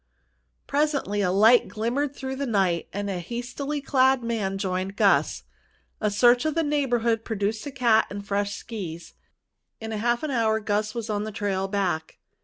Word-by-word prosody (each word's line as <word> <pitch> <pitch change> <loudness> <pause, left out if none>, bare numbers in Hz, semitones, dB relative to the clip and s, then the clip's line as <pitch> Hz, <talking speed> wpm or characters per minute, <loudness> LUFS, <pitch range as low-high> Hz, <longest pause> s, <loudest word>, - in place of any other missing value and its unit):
Presently 285 -8 0
a 185 - +2
light 220 +6 +5
glimmered 260 +6 -2
through 265 0 -5
the 275 +1 -3
night 190 -6 +1
and 205 0 -3
a 190 -3 -2
hastily 245 - -4
clad 265 -2 +3
man 215 -5 -2
joined 190 0 -2
Gus. - - +2 0.6
A 210 - +1
search 240 +4 +4
of 310 -1 -1
the 330 - +2
neighborhood 240 -6 +1
produced 215 +3 -2
a - - -5
cat 235 -5 +3
and 200 0 -7
fresh 200 0 -1
skis. 170 -7 -7 0.7
In 225 0 -6
half 235 +4 0
an 305 - -2
hour 220 -3 +2
Gus 210 +1 -1
was 230 -2 -3
on 205 0 -1
the 215 - -5
trail 195 -2 -2
back. 185 -5 -2
220 Hz, 170 wpm, -25 LUFS, 200-250 Hz, 0.7 s, light